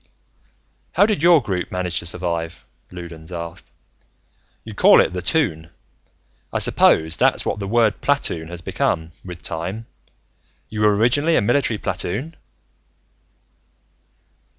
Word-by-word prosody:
"How 195 - +5
did 210 -8 0
your 170 -4 +6
group 95 -5 -3
manage 90 -1 -1
to 85 - -5
survive?" 85 -2 -3 0.3
Loudons 85 -2 -10
asked. 85 -1 -7 0.9
"You - - -9
call - - +6
it - - +2
the 90 - -3
Toon. 85 - 0 0.8
I - - -1
suppose 80 +1 +3
that's - - +2
what - - -2
the 100 - -4
word 115 0 +2
platoon 115 - -1
has 85 0 -7
become, 80 0 -1
with 90 -2 -9
time. 95 +7 -5 0.8
You 110 -1 -4
were, 105 -1 +4
originally, 145 +9 +2
a - - +3
military 120 0 +1
platoon?" 125 - -4
90 Hz, 130 wpm, -21 LUFS, 85-120 Hz, 0.9 s, your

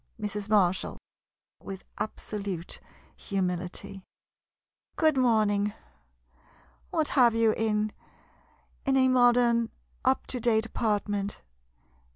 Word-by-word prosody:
Mrs. 210 -1 -4
Marshall 190 -4 +2 0.6
[With 195 -1 -8 0.2
absolute 200 -5 -4 0.4
humility.'] 185 0 -3 0.9
Good 315 -2 +3
morning. 210 -5 +2 1.2
What 320 -5 0
have 240 -4 +4
you 225 -1 +4
in 215 -1 0 0.5
— - - -36
in 270 0 +3
a 260 0 +5
modern 240 -2 +4 0.3
up 260 +1 +2
to 250 - -4
date 225 -1 +2
apartment 205 -3 -2
215 Hz, 95 wpm, -28 LUFS, 200-240 Hz, 1.2 s, a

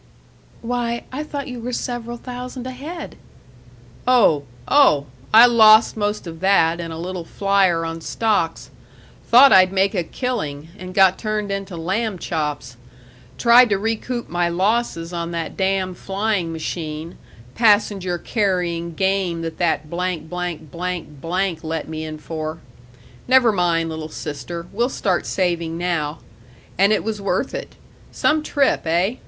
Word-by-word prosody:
"Why, 235 0 -2
I 265 +3 -4
thought 290 -2 -5
you 250 -2 -6
were 240 +2 -5
several 240 -1 -4
thousand 250 +1 -7
ahead!" 290 +6 -7 0.9
"Oh 200 - +4 0.2
oh! 150 - +5 0.3
I 225 +2 +9
lost 220 -2 +6
most 210 -1 -2
of 165 -1 -8
that 175 -3 +3
in 170 -1 -5
a 160 - -6
little 180 +1 -5
flyer 190 -2 +1
on 165 0 -5
stocks 205 -5 -1 0.6
thought 260 +4 +8
I'd 185 -1 +6
make 195 +2 +2
a 185 - 0
killing, 160 - -4
and 185 -2 -9
got 190 -1 +5
turned 215 -2 -2
into 195 -2 -4
lamb 195 +5 -2
chops; 150 -7 -4 0.6
tried 240 +1 +6
to 200 - +2
recoup 225 +3 -3
my 175 0 0
losses 185 -2 0
on 170 -1 -3
that 165 -1 -4
damn 190 -1 0
flying 195 -2 -2
machine, 160 0 -5 0.4
passenger 205 -5 +2
carrying 175 -5 -1
game 190 -3 0
that 165 -1 -6
that 160 -4 +1 0.5
let 170 0 -3
me 160 0 -5
in 155 0 -6
for. 155 0 -5 0.7
Never 255 -2 +5
mind, 170 -4 +1
little 160 0 -6
sister; 165 +3 -6
we'll 235 +5 +1
start 190 -8 -1
saving 170 -3 -1
now. 165 -3 -1 0.6
And 195 +3 +4
it 215 - +2
was 215 -2 -3
worth 200 - -1
it. - - -6 0.4
Some 310 0 +1
trip, 280 - +1
eh? 180 +9 +1
185 Hz, 135 wpm, -21 LUFS, 165-225 Hz, 0.9 s, I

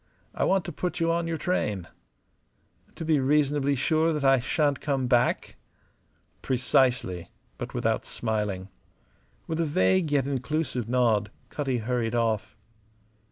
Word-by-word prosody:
I - - 0
want 190 -2 +2
to - - -4
put 180 +3 -3
you 165 0 +2
on 170 0 0
your 165 -1 -2
train." 105 - -1 1.1
"To 165 - -6
be 155 -2 +3
reasonably 145 0 +2
sure 160 +4 +2
that 150 -2 -2
I 135 -1 +5
shan't 145 +3 0
come 135 -3 0
back?" 125 -1 +1 0.8
"Precisely" 125 -8 +1 0.3
but - - -6
without - - 0
smiling. 105 -4 -3 0.8
With 160 0 -3
a 165 - +2
vague 145 - +2
yet 140 -3 +2
inclusive 135 -3 -2
nod 115 -5 +2 0.2
Cutty 135 -4 -1
hurried 120 0 -1
off. 110 -2 -1
135 Hz, 135 wpm, -27 LUFS, 115-155 Hz, 1.1 s, I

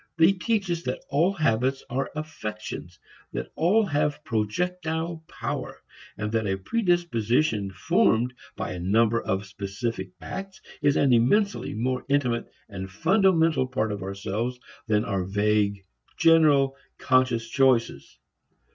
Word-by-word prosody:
They 165 +3 +6
teach 195 -1 -1
us 170 -1 -1
that 125 -6 -4
all 165 +7 +3
habits 135 - +1
are 130 +2 -2
affections, 110 - -6 0.4
that - - -4
all 205 +7 +3
have 150 -3 -1
projectile 160 - -2
power, - - -5 0.4
and 105 0 -3
that 110 -2 0
a 95 0 0
predisposition 125 - +1
formed 115 +5 +2 0.2
by - - -4
a 90 - -5
number 110 +5 +2
of 95 +1 -2
specific 100 +1 -4
acts 195 - -7 0.2
is 145 -1 +3
an 135 -3 +4
immensely 195 - +2
more 125 +3 -1
intimate 125 -5 0 0.2
and 95 -2 -7
fundamental 165 - +3
part 110 -4 -1
of 100 -2 -4
ourselves 100 +6 -3 0.3
than 105 -1 +2
are 100 -2 -1
vague, 100 0 +1 0.3
general, 155 -5 +5 0.2
conscious 125 -3 +2
choices. 120 - +1
125 Hz, 130 wpm, -26 LUFS, 105-160 Hz, 0.4 s, They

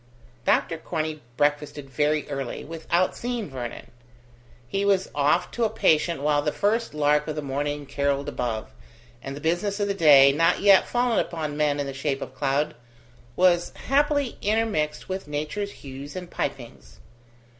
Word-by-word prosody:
Dr 165 - +2
Corney 155 -2 -3 0.2
breakfasted 145 -1 0
very 150 +2 0
early, 135 -3 -4
without 165 +3 0
seeing 240 - -4
Vernon. 125 -3 -7 0.8
He 195 +9 -1
was 195 -2 +2
off 150 +5 +2
to 240 - -2
a 220 - +3
patient 160 -7 +2
while 145 -1 +3
the 150 - 0
first 215 -1 0
lark 150 0 +2
of 155 - -3
the 150 - -4
morning 145 +1 -3
carolled 140 0 -1
above, 120 -6 -3 0.5
and 135 0 -6
the - - -7
business 180 +6 0
of 205 - +1
the 200 - 0
day, 145 -7 +7
not 165 +5 +2
yet 200 -1 +6
fallen 245 -1 +1
upon 155 -3 -3
men 150 -1 +1
in 145 - -1
the 135 - -5
shape 140 0 -2
of - - -10
cloud, 140 +2 0 0.6
was 175 -1 +3
happily 285 -1 +1
intermixed 210 -8 0
with 190 -3 -4
nature's 155 +8 -3
hues 140 -1 -9
and 180 -1 -7
pipings. 120 - -5
150 Hz, 160 wpm, -25 LUFS, 140-190 Hz, 0.8 s, day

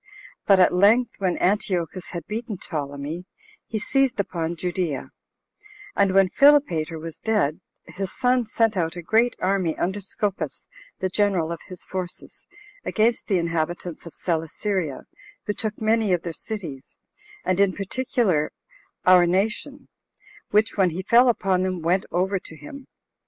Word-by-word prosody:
But 195 -2 +6
at 180 - +5
length, 215 +6 +4
when 185 -3 0
Antiochus 185 -2 0
had 170 -3 -6
beaten 220 -1 -4
Ptolemy, 150 0 -5 0.4
he 220 - -3
seized 265 +2 +1
upon 170 -4 -2
Judea; 175 -4 -3 0.8
and 195 -1 +3
when 195 -1 +6
Philopater 275 - +4
was 160 0 -8
dead, 205 -9 0 0.2
his 195 -1 -5
son 250 -2 +1
sent 225 -1 +1
out 165 -2 -1
a 175 - -6
great 230 +7 +2
army 185 -4 0
under 190 +3 -1
Scopas, 200 +1 -3 0.3
the 190 - 0
general 185 -4 +1
of 170 - -4
his 185 -2 -9
forces, 185 -2 -6 0.4
against 225 +1 +1
the 195 - +2
inhabitants 170 0 -2
of 170 - -11
Celesyria, 165 -1 -2 0.4
who 210 - -1
took 215 0 -3
many 220 -2 +2
of 175 - 0
their 170 - -4
cities, 160 -11 -7 0.5
and 185 0 +1
in 200 -1 +4
particular 195 -5 0 0.5
our 180 -1 +7
nation; 220 +10 -1 0.6
which 215 +2 +2
when 190 -2 +4
he 175 +3 -5
fell 240 +5 +6
upon 190 -5 +1
them, 185 -1 -1
went 180 +3 +1
over 190 +2 +1
to 165 - -12
him. 280 - -11
185 Hz, 145 wpm, -24 LUFS, 170-215 Hz, 0.8 s, our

